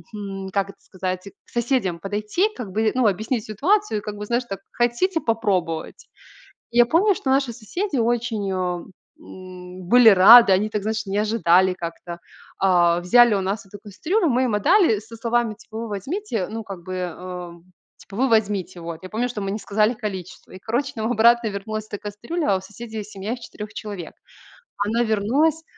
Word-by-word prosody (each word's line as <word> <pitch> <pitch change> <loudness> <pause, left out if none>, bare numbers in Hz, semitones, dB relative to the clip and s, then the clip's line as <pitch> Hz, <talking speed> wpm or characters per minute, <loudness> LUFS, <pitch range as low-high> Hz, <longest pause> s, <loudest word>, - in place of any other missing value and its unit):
м, 195 -2 -6
как 195 -1 0
это - - -13
сказать, 185 0 -5 0.2
к - - -25
соседям 235 -8 0
подойти, 210 - 0
как 215 -7 -7
бы, 220 +2 +1
ну, 255 -3 +2
объяснить 220 +4 -1
ситуацию 345 - +1
и - - -10
как 210 0 -6
бы, 210 0 -6
знаешь, 240 +3 0
так: 195 -1 -6
"Хотите 245 +10 +1
попробовать?" 190 - -2 0.6
Я 240 0 +5
помню, 385 - +3
что 265 - -3
наши 270 -2 +2
соседи 290 - -4
очень, 230 -3 0
э, - - -1
м, 180 0 -7
были 240 0 +8
рады. 200 +3 +9
Они 200 +3 +2
так, 210 -2 -3
знаешь, 220 0 -2
не 195 - -3
ожидали 190 -4 +3
как-то. 170 0 -7 0.4
Э, 175 -2 +4
взяли 235 +5 +5
у - - 0
нас 195 +2 -3
эту 200 +1 -12
кастрюлю. 330 - -1
Мы 255 -1 +2
им 230 -4 0
отдали 225 - +4
со 220 +2 -11
словами, 230 -1 0
типа 220 +1 -11
вы 230 0 -4
возьмите, 225 - -3
ну 225 +1 -5
как 195 -5 -8
бы, 185 +1 -6
э, 180 0 -6 0.5
типа, 195 - -12
вы 265 +4 +2
возьмите. 200 -6 0
Вот. 165 -1 -7
Я 185 - -8
помню, 235 +5 -1
что 230 -4 -5
мы 195 -1 -3
не 210 - -3
сказали 215 +3 +1
количество. 190 -5 -7
И, 185 - -9
короче, 235 +8 -2
нам 220 +2 -2
обратно 235 0 +4
вернулась 215 +2 -5
эта 205 - -6
кастрюля, 230 +7 -3
а - - +2
у - - -9
соседей 220 +2 -8
семья 205 +2 -6
из - - -9
4 - - -18
четырех 210 -2 -9
человек. 200 -6 -7 0.7
Она 230 +3 +1
вернулась. 260 +9 +1
210 Hz, 190 wpm, -22 LUFS, 190-240 Hz, 0.7 s, рады